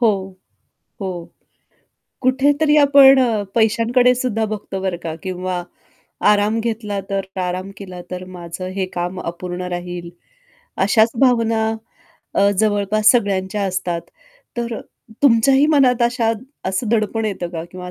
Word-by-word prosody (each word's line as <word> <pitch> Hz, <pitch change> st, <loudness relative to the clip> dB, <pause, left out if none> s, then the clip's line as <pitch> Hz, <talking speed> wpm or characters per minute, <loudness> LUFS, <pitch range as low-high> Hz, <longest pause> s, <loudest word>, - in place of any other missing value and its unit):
हो, 230 Hz, -3 st, +5 dB, 0.9 s
हो. 190 Hz, -, -2 dB, 1.1 s
कुठेतरी 290 Hz, +4 st, +3 dB
आपण 275 Hz, -1 st, +7 dB
अ, 225 Hz, -5 st, +1 dB
पैशांकडे 235 Hz, +3 st, +3 dB
सुद्धा 240 Hz, -3 st, -1 dB
बघतो 195 Hz, -2 st, -5 dB
बरं 190 Hz, -2 st, -2 dB
का. 160 Hz, -1 st, -4 dB
किंवा 185 Hz, -1 st, -3 dB, 0.7 s
आराम 210 Hz, +2 st, +2 dB
घेतला 220 Hz, -3 st, -3 dB
तर, 195 Hz, -1 st, -2 dB
प्राराम 185 Hz, +1 st, -3 dB
केला 185 Hz, -3 st, -9 dB
तर, 180 Hz, 0 st, -5 dB
माझं 175 Hz, +1 st, -6 dB
हे 190 Hz, -, 0 dB
काम 180 Hz, +1 st, -3 dB
अपूर्ण 175 Hz, +1 st, -5 dB
राहील. 175 Hz, -1 st, -6 dB, 0.8 s
अशाच 220 Hz, +3 st, +4 dB
भावना 230 Hz, -3 st, +3 dB, 0.7 s
अ, 200 Hz, 0 st, +4 dB
जवळपास 215 Hz, 0 st, +3 dB
सगळ्यांच्या 200 Hz, -3 st, 0 dB
असतात. 185 Hz, -3 st, -2 dB, 0.6 s
तर 235 Hz, -1 st, -3 dB, 0.4 s
तुमच्याही 270 Hz, +3 st, +5 dB
मनात 260 Hz, -6 st, +3 dB
अशा 235 Hz, -1 st, +2 dB, 0.4 s
असं 190 Hz, +4 st, -2 dB
दडपण 225 Hz, 0 st, 0 dB
येतं 190 Hz, -5 st, -3 dB
का 165 Hz, -2 st, -5 dB
किंवा 180 Hz, -1 st, -8 dB
अ 180 Hz, -, -7 dB
210 Hz, 125 wpm, -19 LUFS, 185-235 Hz, 1.1 s, आपण